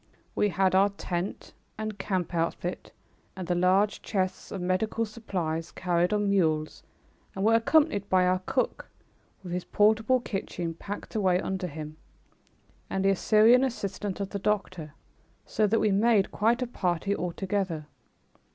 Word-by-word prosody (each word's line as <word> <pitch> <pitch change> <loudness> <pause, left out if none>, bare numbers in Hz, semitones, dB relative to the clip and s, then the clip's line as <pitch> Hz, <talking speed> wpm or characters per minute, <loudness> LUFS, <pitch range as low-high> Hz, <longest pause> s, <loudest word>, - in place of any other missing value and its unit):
We 210 - +2
had 190 0 +1
our 195 +2 +5
tent 185 -2 -5 0.2
and 215 -2 -5
camp 185 -3 -2
outfit 170 +1 -2 0.4
and 185 -2 -6
the 175 - +1
large 185 +4 +2
chests 190 -3 -2
of 195 - -4
medical 185 +5 0
supplies 180 -7 -4
carried 175 0 0
on 210 -1 +1
mules 155 -5 +1 0.5
and 195 +1 -1
were 225 - +5
accompanied 230 - +3
by 185 -1 +4
our 185 0 +2
cook, 255 - -1 0.5
with 175 -2 -6
his 180 0 -2
portable 220 +4 +3
kitchen 185 -7 -4
packed 200 +5 -7
away 185 -4 +2
under 190 -1 -3
him, 155 -1 -8 0.9
and 195 0 -1
the 195 0 +4
Syrian 225 +6 +5
assistant 205 -6 -3
of 195 -1 -4
the 200 - -3
doctor, 185 -7 -2 0.5
so 215 - +1
that 225 +2 +2
we 215 - +2
made 205 0 +3
quite 235 +4 +1
a - - -3
party 185 -2 -1
altogether. 180 -3 -2
195 Hz, 150 wpm, -28 LUFS, 180-210 Hz, 0.9 s, our